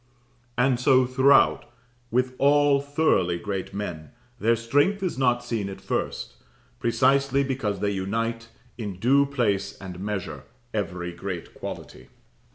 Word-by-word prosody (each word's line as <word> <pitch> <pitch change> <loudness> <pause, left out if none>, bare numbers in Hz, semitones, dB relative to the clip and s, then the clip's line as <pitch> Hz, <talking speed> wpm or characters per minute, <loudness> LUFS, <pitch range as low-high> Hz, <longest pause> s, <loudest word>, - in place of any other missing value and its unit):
And 125 0 +2
so 130 0 +4
throughout 130 +2 +4 0.4
with 125 +2 0
all 145 0 +4
thoroughly 140 - +1
great 95 +1 -4
men, 85 -7 -5 0.3
their 115 +2 +3
strength 145 - +1
is 185 - -1
not 125 -2 +1
seen 105 -4 -3
at 95 - -8
first, - - -3 0.4
precisely 135 +2 +2
because 125 -8 -2
they 100 - +1
unite, 115 +4 -2 0.3
in 100 -5 -5
due 140 +7 +3
place 115 -8 -1
and 90 -2 -8
measure, 100 -1 -4 0.3
every 90 -4 -3
great 90 0 -6
quality. - - -8
115 Hz, 130 wpm, -25 LUFS, 100-135 Hz, 0.4 s, so